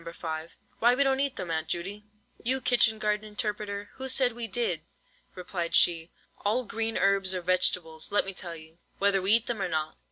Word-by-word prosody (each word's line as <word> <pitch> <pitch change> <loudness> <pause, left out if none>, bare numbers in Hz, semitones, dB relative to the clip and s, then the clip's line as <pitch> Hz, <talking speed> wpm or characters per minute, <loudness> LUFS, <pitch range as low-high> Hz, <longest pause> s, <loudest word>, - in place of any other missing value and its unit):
5, 160 -1 -6 0.2
"why 240 +2 +5
we 280 - +3
don't 270 -1 +1
eat 280 -1 0
them, 175 - -5
Aunt 160 0 -1
Judy." 195 +5 -4 0.4
"You 260 +3 +1
kitchen 235 -3 +3
garden 210 0 0
interpreter, 210 -1 -4
who 265 0 -3
said 255 -2 +4
we 235 0 -4
did?" 200 -6 0 0.5
replied 175 -2 -3
she. 165 -1 +3 0.3
"All 220 +5 +1
green 225 +2 -2
herbs 195 -1 +2
are 180 - -2
vegetables, 175 -3 +1
let 205 - +3
me 195 - -4
tell 175 -2 -4
you, 160 +1 -14 0.2
whether 200 -1 +2
we 195 +3 +5
eat 230 +1 +5
them 235 -4 -3
or 190 - 0
not." 155 -2 -2
200 Hz, 195 wpm, -28 LUFS, 175-225 Hz, 0.5 s, why